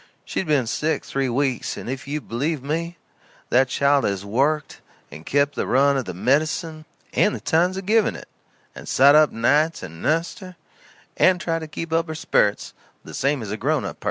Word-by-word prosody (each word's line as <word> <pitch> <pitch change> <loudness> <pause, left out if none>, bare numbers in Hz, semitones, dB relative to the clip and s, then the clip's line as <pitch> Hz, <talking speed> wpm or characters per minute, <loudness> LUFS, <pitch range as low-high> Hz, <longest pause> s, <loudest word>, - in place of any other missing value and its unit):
She's - - -3
ben 145 -5 +2
sick 150 +6 -2
three 135 -1 -2
weeks; 130 0 -1
and - - -8
if 130 +1 -5
you 150 +2 -3
believe 140 +5 -3
me 165 +4 -3 0.5
that 130 +2 +4
child 140 +2 +2
has 100 -1 -2
worked, 140 +8 -1 0.3
and 75 +3 -11
kep' 145 +1 +2
the - - -3
run 140 +2 +3
of 130 -3 -1
the 90 - -6
med'cin, 155 - 0 0.3
and 210 - +2
the - - -6
times 180 +4 +1
of 190 - -6
giving 220 +2 +2
it, - - -10 0.5
and - - -11
sot 140 +2 +6
up 155 -1 +5
nights 150 +7 +1
and 80 -2 -9
nussed 165 +8 0
her, 185 -2 -11 0.6
and 185 -1 +4
tried 165 -1 -2
to 160 - -7
keep 165 +1 -6
up 165 +1 +1
her 160 - -5
sperits, 155 -10 0 0.3
the - - -10
same 140 -3 0
as 105 - -6
a 105 - -3
grown 145 +5 0
up - - -6
person. - - -40
145 Hz, 205 wpm, -22 LUFS, 130-160 Hz, 0.6 s, sot